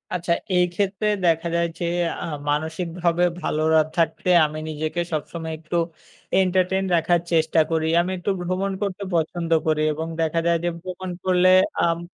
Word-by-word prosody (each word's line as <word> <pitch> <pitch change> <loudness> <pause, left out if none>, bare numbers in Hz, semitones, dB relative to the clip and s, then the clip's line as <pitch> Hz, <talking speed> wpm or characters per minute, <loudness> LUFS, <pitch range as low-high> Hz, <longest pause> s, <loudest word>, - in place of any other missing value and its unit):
আচ্ছা, 175 -1 -2 0.2
এই 180 0 +5
ক্ষেত্রে 200 +2 -1 0.2
দেখা 165 0 +2
যায় 170 0 +2
যে 175 - -1 0.4
আ - - -3 0.2
মানসিকভাবে 165 +3 -1 0.2
ভালোরা 160 +1 +2 0.2
থাকতে 165 +2 0 0.2
আমি 155 +1 -5
নিজেকে 155 +3 -2
সবসময় 160 +1 -4
একটু 165 +2 -3 0.6
entertain 190 0 +2
রাখার 170 +1 +2
চেষ্টা 160 0 +2
করি। 160 -1 +1
আমি 180 +2 -3
একটু 180 +3 -1
ভ্রমণ 185 +2 -1
করতে 200 -1 -3
পছন্দ 165 +1 -1 0.2
করি 155 -1 +2
এবং 160 +2 -4
দেখা 165 +1 +1
যায় 170 0 +3
যে 175 - +1
ভ্রমণ 185 +1 -6 0.2
করলে 185 0 +4 0.3
আম 170 0 +1
170 Hz, 155 wpm, -23 LUFS, 160-180 Hz, 0.6 s, এই